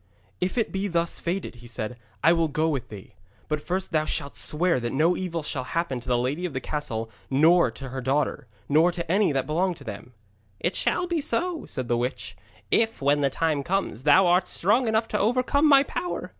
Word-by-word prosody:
'If 185 Hz, +6 st, -2 dB
it 230 Hz, -, +1 dB
be 195 Hz, +1 st, -2 dB
thus 170 Hz, -2 st, 0 dB
fated,' 175 Hz, -7 st, -3 dB
he 120 Hz, 0 st, -13 dB
said, 110 Hz, 0 st, -5 dB, 0.3 s
'I 165 Hz, -, +6 dB
will 165 Hz, -1 st, +2 dB
go 155 Hz, +2 st, 0 dB
with 140 Hz, -6 st, -2 dB
thee. 100 Hz, -3 st, -11 dB, 0.3 s
But 150 Hz, -1 st, -2 dB
first 185 Hz, +3 st, -3 dB
thou 155 Hz, -2 st, +1 dB
shalt 140 Hz, -2 st, -3 dB
swear 170 Hz, -1 st, +1 dB
that 120 Hz, -1 st, -3 dB
no 160 Hz, +6 st, +2 dB
evil 170 Hz, -3 st, -3 dB
shall 135 Hz, -3 st, -3 dB
happen 150 Hz, -1 st, -2 dB
to 120 Hz, -, -15 dB
the 125 Hz, -1 st, +2 dB
lady 135 Hz, +8 st, -1 dB
of 165 Hz, -, -9 dB
this 130 Hz, -, -4 dB
castle 115 Hz, -7 st, -3 dB, 0.2 s
nor 160 Hz, +6 st, +5 dB
to 135 Hz, -1 st, -8 dB
her 130 Hz, +1 st, -5 dB
daughter, 135 Hz, -1 st, -1 dB, 0.2 s
nor 160 Hz, +5 st, +4 dB
to 170 Hz, -2 st, -4 dB
any 195 Hz, -2 st, +3 dB
that 135 Hz, -2 st, 0 dB
belong 175 Hz, +5 st, 0 dB
to 145 Hz, -, -13 dB
them.' 115 Hz, +1 st, -8 dB, 0.5 s
'It 175 Hz, -, -1 dB
shall 360 Hz, -, +1 dB
be 345 Hz, -3 st, -1 dB
so,' 330 Hz, +6 st, -1 dB
said 130 Hz, -3 st, -4 dB
the 120 Hz, -, +1 dB
witch, 125 Hz, +2 st, -4 dB, 0.4 s
'if, 225 Hz, 0 st, +2 dB
when 145 Hz, +1 st, +2 dB
the 140 Hz, -, +3 dB
time 155 Hz, +1 st, 0 dB
comes, 180 Hz, -, -2 dB
thou 150 Hz, +7 st, +5 dB
art 180 Hz, +1 st, +3 dB
strong 230 Hz, +7 st, +2 dB
enough 220 Hz, +1 st, +1 dB
to 210 Hz, -, -1 dB
overcome 255 Hz, +7 st, +2 dB
my 275 Hz, -1 st, +7 dB
power. 355 Hz, +5 st, -4 dB
160 Hz, 215 wpm, -25 LUFS, 135-190 Hz, 0.5 s, my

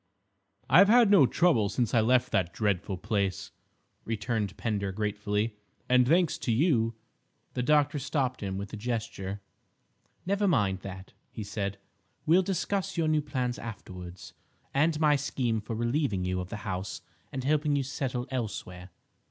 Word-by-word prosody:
"I've 195 Hz, -, +7 dB
had 235 Hz, -2 st, +6 dB
no 165 Hz, -11 st, +7 dB
trouble 120 Hz, -, +3 dB
since 115 Hz, +1 st, -1 dB
I 115 Hz, -, +5 dB
left 125 Hz, +2 st, +3 dB
that 90 Hz, -2 st, +1 dB
dreadful 100 Hz, -2 st, 0 dB
place," 100 Hz, -1 st, -2 dB, 0.5 s
returned 110 Hz, -3 st, -2 dB
Pender 100 Hz, -4 st, -1 dB
gratefully; 105 Hz, +1 st, -1 dB, 0.3 s
"and 125 Hz, -1 st, +4 dB
thanks 170 Hz, +3 st, +3 dB
to 120 Hz, -, -1 dB
you—" 115 Hz, -4 st, +2 dB, 0.6 s
The 125 Hz, -, -1 dB
doctor 145 Hz, +2 st, +3 dB
stopped 130 Hz, -2 st, -1 dB
him 95 Hz, -2 st, -3 dB
with 100 Hz, +1 st, -6 dB
a -, -, -4 dB
gesture. 105 Hz, -4 st, -4 dB, 0.8 s
"Never 200 Hz, +2 st, +1 dB
mind 100 Hz, -, +2 dB
that," 95 Hz, 0 st, -9 dB, 0.2 s
he 110 Hz, -, -6 dB
said, 100 Hz, -1 st, -3 dB, 0.5 s
"we'll 170 Hz, +4 st, +5 dB
discuss 195 Hz, +1 st, -2 dB
your 165 Hz, -1 st, +2 dB
new 155 Hz, -1 st, +2 dB
plans 125 Hz, -4 st, -2 dB
afterwards, 90 Hz, -5 st, -9 dB, 0.4 s
and 155 Hz, +3 st, +2 dB
my 150 Hz, -2 st, +4 dB
scheme 125 Hz, -5 st, -1 dB
for 110 Hz, +2 st, -5 dB
relieving 120 Hz, -4 st, 0 dB
you 90 Hz, 0 st, -1 dB
of 90 Hz, 0 st, -5 dB
the 105 Hz, -, -5 dB
house 95 Hz, -1 st, -4 dB, 0.3 s
and 130 Hz, -, -4 dB
helping 150 Hz, +1 st, +2 dB
you 140 Hz, -, +1 dB
settle 130 Hz, -2 st, -3 dB
elsewhere. 95 Hz, -7 st, -5 dB
115 Hz, 150 wpm, -29 LUFS, 100-145 Hz, 0.8 s, I've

